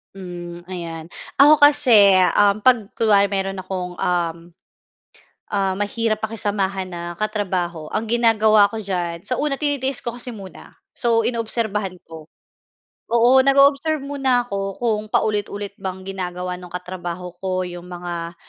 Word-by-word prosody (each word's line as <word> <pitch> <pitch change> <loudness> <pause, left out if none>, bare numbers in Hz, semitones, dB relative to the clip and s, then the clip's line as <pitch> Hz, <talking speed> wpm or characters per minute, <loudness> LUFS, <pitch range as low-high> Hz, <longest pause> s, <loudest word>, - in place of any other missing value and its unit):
Hmm, 175 -2 -8
ayan. 170 -3 -6 0.3
Ako 295 +2 +8
kasi, 255 -9 +6 0.2
uhm, 205 0 +4
'pag 225 -3 +3
kunwari 205 -3 +4
mayro'n 195 -1 -2
akong, 180 -1 -5
uhm, 170 -1 -2 1.0
ah, 195 -2 0
mahirap 215 +2 -2
pakisamahan 200 -3 -2
na 175 -1 -6
katrabaho, 185 -7 -2
ang 220 +1 -2
ginagawa 220 -3 +4
ko 225 - -5
diyan 175 -4 -3
sa 250 - 0
una 285 -2 -1
tinitiis 280 -3 -1
ko 235 0 -5
kasi 245 +1 -7
muna. 195 -4 -11 0.2
So, 230 -2 +1
inoobserbahan 220 -5 -2
ko. 160 -1 -10 0.9
Oo 240 +3 +5
nag-o-observe 280 +3 +4
muna 270 -3 0
ako 195 -3 -4
kung 220 -3 +1
paulit-ulit 205 -1 -1
bang 190 0 -5
ginagawa 180 -1 -4
nung 180 -1 -12
katrabaho 180 -1 -6
ko 185 -1 -1
yung 175 0 -9
mga, 175 -1 -6
200 Hz, 135 wpm, -21 LUFS, 180-230 Hz, 1.0 s, Ako